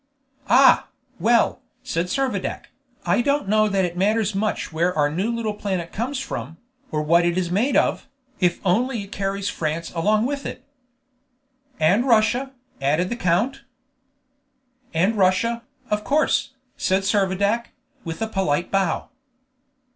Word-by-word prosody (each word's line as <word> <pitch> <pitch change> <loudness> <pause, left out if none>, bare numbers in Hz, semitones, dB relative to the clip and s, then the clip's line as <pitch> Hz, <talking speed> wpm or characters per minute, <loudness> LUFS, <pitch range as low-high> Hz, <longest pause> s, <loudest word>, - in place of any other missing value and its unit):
"Ah! 260 +1 +6 0.3
well," 230 +6 +2 0.2
said 165 +2 -2
Servadac, 240 -2 -2 0.3
"I - - +3
don't 280 -3 0
know 215 +1 +3
that 195 -2 +1
it 175 -1 -4
matters 210 +3 +1
much 205 -4 -2
where 170 +2 0
our 145 -1 +2
new 190 +9 -1
little 230 -2 -2
planet 190 -5 -3
comes 255 +5 -2
from, 160 - -6 0.3
or 150 -1 -1
what 170 +3 +4
it 175 +1 +1
is 175 -2 -1
made 225 +10 +2
of, - - +1 0.3
if 180 -2 +2
only 230 +4 +1
it 200 - -13
carries 195 0 -2
France 165 -1 -3
along 210 +6 +2
with 280 +1 -2
it." - - -7 1.2
"And 190 +11 +3
Russia," 240 +3 +3 0.3
added 155 +8 +1
the - - -1
count. 205 +6 0 1.3
"And 185 +7 +1
Russia, 215 +5 +2 0.3
of 210 0 0
course," 290 -1 +1 0.2
said 190 +1 +1
Servadac, 200 +3 +1 0.4
with 165 +6 -4
a - - -1
polite 180 -6 -1
bow. 195 -4 0
195 Hz, 140 wpm, -23 LUFS, 175-230 Hz, 1.3 s, Ah